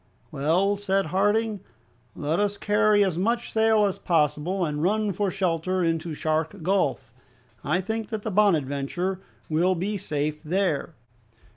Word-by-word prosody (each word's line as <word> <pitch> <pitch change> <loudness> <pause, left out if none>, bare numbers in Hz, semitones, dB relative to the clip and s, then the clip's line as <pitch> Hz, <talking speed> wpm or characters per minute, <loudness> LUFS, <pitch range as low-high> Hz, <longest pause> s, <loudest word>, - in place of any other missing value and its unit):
"Well," 180 +8 +1
said 195 -1 0
Harding, 205 +5 +1 0.6
"let 150 +3 -1
us 205 0 0
carry 210 0 +3
as 180 -4 -1
much 235 +5 0
sail 220 -1 +4
as 195 - -2
possible, 165 +3 +1
and 150 -1 -3
run 210 +4 +1
for 200 +2 0
shelter 185 -1 -1
into 165 -1 -1
Shark 160 +4 -2
Gulf. 140 - 0 0.5
I 175 +6 +1
think 220 +2 -4
that 220 -2 -4
the 220 - -3
'Bonadventure' 175 -1 +1 0.3
will 175 +4 +2
be 200 +4 -2
safe 150 -4 -3
there." 170 -2 -1
185 Hz, 140 wpm, -25 LUFS, 155-205 Hz, 0.6 s, sail